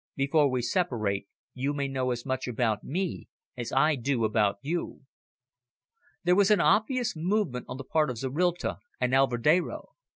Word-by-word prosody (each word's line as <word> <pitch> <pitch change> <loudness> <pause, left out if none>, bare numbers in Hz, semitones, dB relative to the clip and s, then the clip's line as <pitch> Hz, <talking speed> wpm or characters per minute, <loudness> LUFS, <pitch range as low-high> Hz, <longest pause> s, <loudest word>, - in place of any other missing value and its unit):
Before 140 +1 +3
we 125 -2 -1
separate, 115 - -1 0.3
you 135 +3 -2
may 140 -1 -1
know 130 -1 -1
as 120 -1 -3
much 130 -1 -2
about 115 -3 0
me 180 +4 -3 0.3
as 120 -2 -5
I 150 +4 +4
do 125 -2 0
about 105 -2 +1
you." 170 +4 -3 1.2
There 180 +1 +4
was 200 +1 +4
an 210 - +5
obvious 245 +3 +2
movement 170 - -1
on - - -5
the 140 - -6
part 155 +2 +1
of 125 - -4
Zorrilta 165 +8 -1 0.2
and 125 0 0
Alvedero. 135 +6 +2
135 Hz, 160 wpm, -28 LUFS, 125-170 Hz, 1.2 s, an